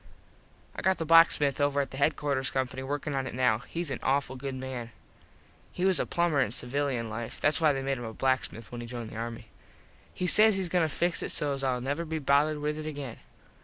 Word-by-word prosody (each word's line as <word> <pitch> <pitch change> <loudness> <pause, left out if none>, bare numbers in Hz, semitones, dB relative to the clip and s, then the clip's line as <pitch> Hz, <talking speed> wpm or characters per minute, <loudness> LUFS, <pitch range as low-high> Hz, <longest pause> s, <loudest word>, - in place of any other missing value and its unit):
I - - -4
got 190 0 +2
the 165 - -3
blacksmith 150 -4 +5
over 145 0 +2
at 140 -2 -2
headquarters 140 -1 0
company 130 0 -2
workin 145 +2 -3
on 135 -1 -1
it - - -6
now. 125 -4 +2
Hes 165 +4 -4
an 130 - -3
awful 135 -1 0
good 135 +1 -5
man. 130 -3 -5 0.8
He 180 - -2
was 190 -1 +3
a - - -1
plumber 170 -5 +1
in 105 - 0
civilian 125 -1 -1
life. 110 +1 -6
Thats 150 +3 +2
why 155 -2 +5
they 135 -1 -2
made 135 -1 -1
him 120 - -6
a 110 - -5
blacksmith 130 -2 -1
when 120 -1 -6
he 120 - -7
joined 120 -2 -6
the - - -9
army. 115 0 -6 0.6
He 180 - -3
says 215 +3 +5
hes 185 -2 0
goin 180 +1 +2
to 160 - +1
fix 175 +4 0
it - - -3
sos 140 -2 -1
Ill 130 -2 0
never 145 +6 -2
be 160 -1 -3
bothered 145 +1 +2
with 150 +1 -2
it 155 - -5
again. 140 -5 -6
140 Hz, 225 wpm, -29 LUFS, 125-155 Hz, 0.8 s, blacksmith